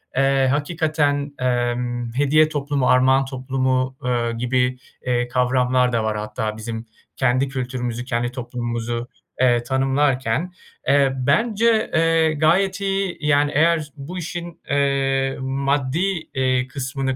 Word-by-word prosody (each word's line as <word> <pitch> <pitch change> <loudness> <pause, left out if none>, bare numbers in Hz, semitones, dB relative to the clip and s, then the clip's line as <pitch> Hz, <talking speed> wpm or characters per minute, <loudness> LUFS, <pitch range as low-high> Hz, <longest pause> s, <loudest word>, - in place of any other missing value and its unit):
eee, 135 0 +3
hakikaten, 145 -1 0
emm, 120 -1 -1
hediye 145 +4 +3
toplumu, 145 -3 -1
armağan 130 +1 +4
toplumu, 130 0 -1
eee, 120 -2 0
gibi, 125 +1 0 0.3
eee, 120 -1 0
kavramlar 125 0 +2
da 115 -2 0
var 110 -1 -1
hatta 110 +1 -4
bizim 115 +1 -6 0.3
kendi 130 +1 +1
kültürümüzü, 125 -2 -4
kendi 120 -1 -1
toplumumuzu, 120 -1 -4 0.3
eee, 120 -2 +3
tanımlarken. 135 +3 0 0.3
Eee, 140 0 +4
bence, 220 +7 +2
eee, 165 -1 +3
gayet 180 +6 +2
iyi 195 -2 -1
yani 145 -1 +2
eğer 160 -1 +2
bu 155 +6 -7
işin, 175 0 -6
eee, 135 -1 +1
maddi, 140 +6 -1
eee, 130 -1 +1
kısmını 130 0 -3
135 Hz, 120 wpm, -21 LUFS, 125-150 Hz, 0.3 s, armağan